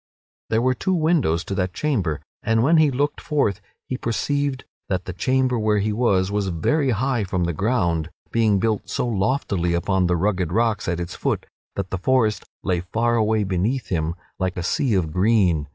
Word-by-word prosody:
There 115 +1 +2
were 130 0 +3
two 185 +9 -1
windows 155 - +2
to - - -4
that 90 -2 -2
chamber, 100 - -1 0.2
and 115 +1 +2
when 160 +5 +4
he 155 -2 +5
looked 145 +2 -1
forth 140 - 0 0.3
he 130 - -3
perceived 140 +3 -1 0.2
that 95 -1 -1
the 90 - -5
chamber 130 +4 +1
where 105 -1 +2
he 105 +1 0
was 100 -5 +2
was 100 -1 0
very 135 - +1
high 125 0 0
from 90 -2 -1
the 85 0 0
ground, 85 -5 0 0.2
being 110 -3 +3
built 110 +1 -1
so - - -1
loftily 100 -5 0
upon 95 +1 +1
the 90 0 +1
rugged 90 -2 0
rocks 115 0 +1
at 90 -1 -1
its 85 -1 -4
foot - - -2 0.3
that 100 -2 -4
the 95 - -2
forest 115 0 +1 0.2
lay 90 -2 +1
far 115 +6 0
away 110 -1 +2
beneath 100 +7 -1
him 80 -2 -1 0.2
like 95 -1 -1
a 90 - -2
sea 115 +5 +1
of 85 -5 0
green. 90 -5 +2
105 Hz, 190 wpm, -23 LUFS, 90-125 Hz, 0.3 s, he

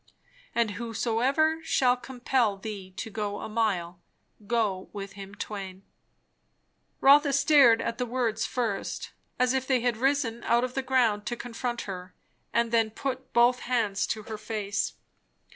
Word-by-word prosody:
And 230 -3 +2
whosoever 245 +8 0
shall 255 -6 +3
compel 245 -3 0
thee 195 -2 -7
to 225 - -5
go 205 -1 -3
a - - -5
mile, 190 -6 -1 0.5
go 205 -5 0
with 200 -1 -6
him 200 0 -10
twain." 195 -2 -6 1.2
Rotha 285 +1 +6
stared 280 -5 +6
at 235 +1 -3
the 250 - -1
words 230 -2 -1
first, 230 -6 -2 0.3
as 250 0 +2
if 260 0 -1
they 260 -3 +2
had 240 -2 0
risen 255 -2 0
out 235 +1 +3
of 255 0 -2
the 270 - -1
ground 245 -6 +1
to 240 - -1
confront 240 0 -4
her; 185 -2 -7 0.4
and 235 -1 +1
then 225 -2 +3
put 260 +3 -5
both 240 +1 +4
hands 225 -6 0
to 215 - -3
her 215 0 -7
face. 210 -2 -2
230 Hz, 150 wpm, -28 LUFS, 210-255 Hz, 1.2 s, Rotha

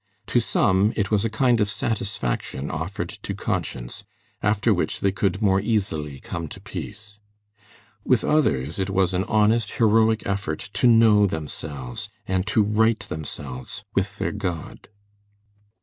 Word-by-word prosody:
To 120 - +6
some 100 -2 +2
it 100 -1 -1
was 105 -1 +3
a 115 - 0
kind 120 +1 +2
of 105 - +2
satisfaction 95 - -2
offered 80 +5 -4
to - - -4
conscience, - - -3 0.4
after 105 -1 +2
which - - -1
they 100 - +2
could 100 +1 -1
more 95 -1 +4
easily 80 - -1
come 85 +3 -5
to 85 - -10
peace. 105 +1 -8 0.8
With - - +3
others 75 - +1
it 95 0 0
was 95 -1 +2
an 95 +2 0
honest, 110 0 +2
heroic 110 -1 +3
effort 100 -2 -3
to 125 - +3
know 110 -3 +6
themselves 75 -6 -6 0.2
and 95 +1 -1
to 110 0 +3
right 110 +2 +3
themselves 75 - -7
with 100 +1 -1
their - - -1
God. 90 -6 -5
100 Hz, 145 wpm, -24 LUFS, 85-110 Hz, 0.8 s, To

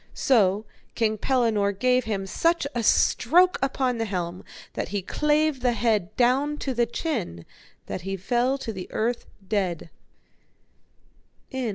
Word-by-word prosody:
So 210 -5 +3 0.3
King 220 -2 0
Pellinore 225 -6 +1
gave 250 +4 +2
him 200 -3 -2
such 335 - +1
a 240 - -1
stroke 360 +10 +4
upon 260 -2 0
the 225 - 0
helm 180 -3 -4 0.3
that - - -3
he 200 -2 -2
clave 300 +4 +1
the 250 -1 +1
head 215 -5 0
down 270 +5 +2
to 270 -3 -3
the 240 -1 +1
chin, 225 - -4 0.4
that - - -5
he 195 +2 -4
fell 245 +7 0
to 230 -5 -5
the 185 -2 -7
earth 235 +2 -1 0.2
dead. 185 -5 -2
230 Hz, 140 wpm, -25 LUFS, 200-260 Hz, 0.4 s, stroke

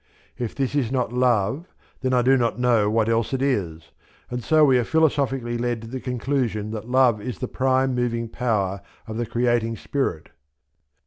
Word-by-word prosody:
If 120 -3 -4
this 135 -1 -1
is 135 -5 0
not 125 -3 -1
Love, 125 - +1 0.3
then 130 - 0
I 125 -1 +3
do 135 +2 +5
not 120 -3 0
know 120 -4 +3
what 110 0 +1
else 115 +1 0
it 135 - -1
is; 85 - -2 0.4
and 125 -1 -3
so 155 +3 +5
we 130 -3 +4
are - - +1
philosophically 135 -5 +1
led 120 -1 -1
to - - -8
the 130 +3 -5
conclusion 125 -4 -2
that 110 +1 -6
Love 125 -4 +3
is 125 +3 -5
the 125 - -4
prime 130 +1 +1
moving 120 -1 -1
power 100 -5 -1 0.2
of 110 -1 -6
the 120 -1 -2
Creating 120 -1 0
Spirit. 135 - -3
120 Hz, 185 wpm, -23 LUFS, 115-130 Hz, 0.4 s, do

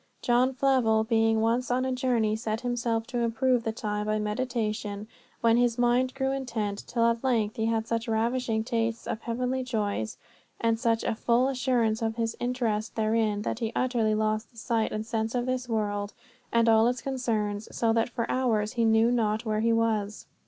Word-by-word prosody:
John 250 +2 +2
Flavel 250 -5 +3
being 225 -1 +2
once 235 +3 +1
on 255 +1 +1
a 260 - -1
journey 245 -4 +1
set 220 0 -3
himself 235 -2 -1
to 245 0 -3
improve 235 +1 +1
the 225 - -1
time 210 -2 -3
by 215 0 +1
meditation, 215 -2 -2 0.3
when 230 0 +4
his 240 -1 +2
mind 245 +1 +2
grew 265 0 0
intent, 225 -7 -3
till 230 -1 +1
at 235 +1 +1
length 225 -5 +1
he 220 0 0
had 225 -1 0
such 230 +1 -2
ravishing 225 0 0
tastes 230 -1 -2
of 220 - -4
heavenly 250 +3 -2
joys, 205 - -2 0.4
and 230 -1 +1
such 230 -1 +1
a - - 0
full 235 +3 +2
assurance 240 -4 +1
of 225 0 -1
his 230 -1 -2
interest 235 -3 -1
therein, 215 -1 +1
that - - -3
he 225 -2 -2
utterly 235 -4 +1
lost 215 +1 -1
the 235 - -23
sight 225 -1 0
and 215 0 -3
sense 225 +1 -2
of 245 0 0
this 255 -1 -2
world 205 -2 -1 0.4
and 230 0 +3
all 225 0 +5
its 245 0 -1
concerns, 220 -6 -2
so 225 -1 +1
that 230 +2 +1
for 235 -1 -2
hours 220 -5 0
he 235 -2 +1
knew 225 +1 +4
not 220 -1 0
where 215 -1 0
he 230 +1 +2
was. 220 -2 0
230 Hz, 190 wpm, -27 LUFS, 220-245 Hz, 0.4 s, all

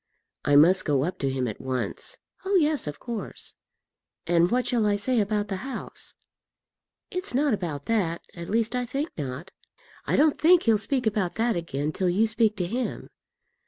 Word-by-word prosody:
"I 145 - +3
must 175 +6 +6
go 140 -4 +1
up 180 +5 -3
to 135 - 0
him 130 -1 -1
at 110 - -6
once." 130 -1 -3 0.3
"Oh, 390 +1 0
yes, 305 - +3
of 145 - -5
course." 235 -3 -6 0.7
"And 170 0 +3
what 250 +3 +1
shall 235 -4 +1
I 205 - +3
say 235 +4 0
about 210 0 0
the 195 -1 -3
house?" 265 +7 -7 1.0
"It's 365 -6 -3
not 285 -1 +3
about 160 -8 -3
that, 185 -7 0
at 170 -1 -8
least 230 +3 0
I 250 - 0
think 275 +6 -3
not. 140 +5 -5 0.6
I - - +2
don't 305 0 +3
think 345 +2 +6
he'll 225 -3 +4
speak 255 +3 0
about 205 -5 0
that 230 0 +1
again 155 -3 -2
till 185 +3 0
you 200 +6 +3
speak 220 -1 +2
to 180 - 0
him." 240 +7 -3
210 Hz, 185 wpm, -26 LUFS, 170-245 Hz, 1.0 s, must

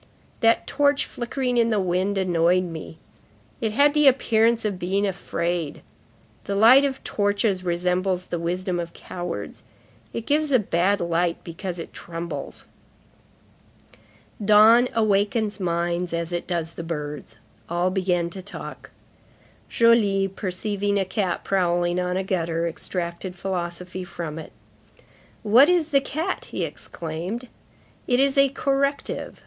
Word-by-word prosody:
"That 230 -1 +3
torch 285 -1 +2
flickering 250 +1 -2
in 230 -1 +3
the 215 -2 +1
wind 185 +2 0
annoyed 180 -1 +2
me. 165 -2 -7 0.6
It 220 -2 0
had 285 +4 +4
the 300 -1 +4
appearance 230 -3 +3
of 200 -4 -2
being 195 +3 0
afraid. 175 -4 -3 0.6
The 200 - -2
light 235 +7 +7
of 270 -1 -2
torches 205 -2 0
resembles 180 +1 0
the 175 - -4
wisdom 180 +1 -2
of 170 0 -5
cowards; 175 - -6 0.5
it 230 - -5
gives 300 0 +1
a 260 - +6
bad 200 -1 +1
light 170 0 0
because 175 +1 -6
it 165 - -8
trembles." 165 -3 -7 1.8
Dawn 220 +4 +6
awakens 210 0 +1
minds 170 -1 -1
as 170 0 -3
it 175 - -3
does 170 -2 -2
the - - -6
birds; 150 -3 -5 0.3
all 175 +2 +1
began 180 -3 0
to 190 - -7
talk. 200 +2 -9 0.8
Joly, 210 -4 +4
perceiving 200 +1 -2
a 195 - +1
cat 190 -2 -2
prowling 175 -2 +1
on 180 0 -1
a 190 - -1
gutter, 170 -3 -1
extracted 170 +2 -4
philosophy 180 0 -4
from 165 -3 -6
it. 160 - -9 0.9
"What 240 +8 +6
is 345 -3 +2
the 280 -3 +3
cat?" 315 +7 -3
he - - -4
exclaimed. 175 +10 -6 0.6
"It 245 0 +2
is 275 0 +3
a 275 0 +5
corrective. 275 +1 -1
190 Hz, 135 wpm, -24 LUFS, 175-225 Hz, 1.8 s, light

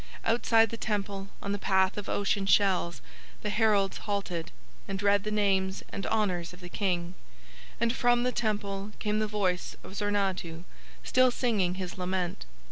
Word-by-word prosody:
Outside 225 -1 +4
the 230 - -4
Temple 200 -3 -2 0.2
on 200 - -2
the 205 - -1
path 190 -1 +3
of 205 - -5
ocean 200 -1 0
shells 190 -4 +3 0.4
the 210 - -1
heralds 205 -3 +3
halted, 195 -5 -3 0.4
and 195 -1 -3
read 200 -1 +4
the 215 - -2
names 195 -2 +1
and 195 - -4
honours 180 -6 0
of 180 - -12
the 175 -1 -9
King; 175 -3 -1 0.7
and 230 +1 +2
from 240 -1 +3
the 250 - +1
Temple 205 -3 -2
came 210 0 0
the 215 - +1
voice 195 -4 -1
of - - -10
Zornadhu 195 -5 -1 0.4
still 255 0 +4
singing 215 -8 +1
his 185 0 -5
lament. 180 - -2
200 Hz, 160 wpm, -29 LUFS, 185-215 Hz, 0.7 s, Outside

